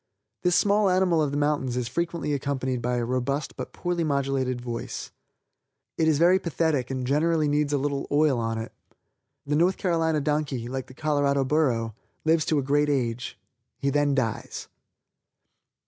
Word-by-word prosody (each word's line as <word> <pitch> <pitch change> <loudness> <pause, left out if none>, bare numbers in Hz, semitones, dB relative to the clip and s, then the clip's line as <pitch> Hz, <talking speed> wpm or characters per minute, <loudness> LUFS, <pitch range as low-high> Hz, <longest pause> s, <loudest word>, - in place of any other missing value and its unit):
This 180 -1 +2
small 205 0 +3
animal 180 -3 +3
of 150 - +1
the 145 - -2
mountains 145 -4 0
is 125 -2 -1
frequently 170 +2 -2
accompanied 135 -3 -2
by 125 +1 0
a 120 -1 0
robust 130 +4 -2
but - - -6
poorly 175 -1 -2
modulated 135 -4 0
voice. 120 -1 -5 0.8
It 160 - +1
is 155 -2 +3
very 175 +4 +5
pathetic 160 -7 0
and 130 -1 -3
generally 155 +3 +2
needs 145 0 +1
a 145 - +2
little 140 0 -2
oil 145 -3 +3
on 115 -1 -1
it. 110 0 -5 0.7
The 145 +1 0
North 175 +4 +3
Carolina 165 -4 +1
donkey 145 -4 -1
like 130 +1 -4
the 130 - -14
Colorado 145 -2 +1
burro, 130 -6 +1 0.3
lives 160 0 +3
to 155 - +1
a 140 - +1
great 145 +2 +2
age. 125 -3 -1 0.4
He 140 - 0
then 145 0 +2
dies. 115 -5 -3
145 Hz, 165 wpm, -26 LUFS, 130-155 Hz, 0.8 s, very